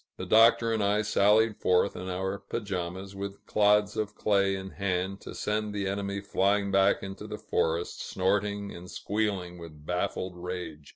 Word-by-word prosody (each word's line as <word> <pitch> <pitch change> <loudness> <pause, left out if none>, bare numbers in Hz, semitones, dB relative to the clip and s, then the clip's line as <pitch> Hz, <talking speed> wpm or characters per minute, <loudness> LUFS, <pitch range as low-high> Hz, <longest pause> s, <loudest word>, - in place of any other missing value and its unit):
The - - -5
Doctor 115 +1 +5
and 110 -2 0
I 105 +1 +2
sallied 105 +1 +3
forth 90 +2 +2
in 90 +1 -5
our 95 +2 -2
pajamas, 95 -2 -4
with 100 0 -6
clods 105 -1 +3
of 105 -1 -2
clay 100 -2 +2
in 95 0 -6
hand, 95 0 -2
to - - -9
send 105 0 -2
the 100 -1 -1
enemy 100 0 -2
flying 100 0 +1
back 95 +1 +3
into 95 0 -7
the - - -5
forest, 80 +2 -1
snorting 100 +1 -1
and 90 +1 -10
squealing 100 -4 -2
with 75 -3 -11
baffled 90 +1 -2
rage. 90 -4 -6
100 Hz, 165 wpm, -28 LUFS, 90-105 Hz, -, Doctor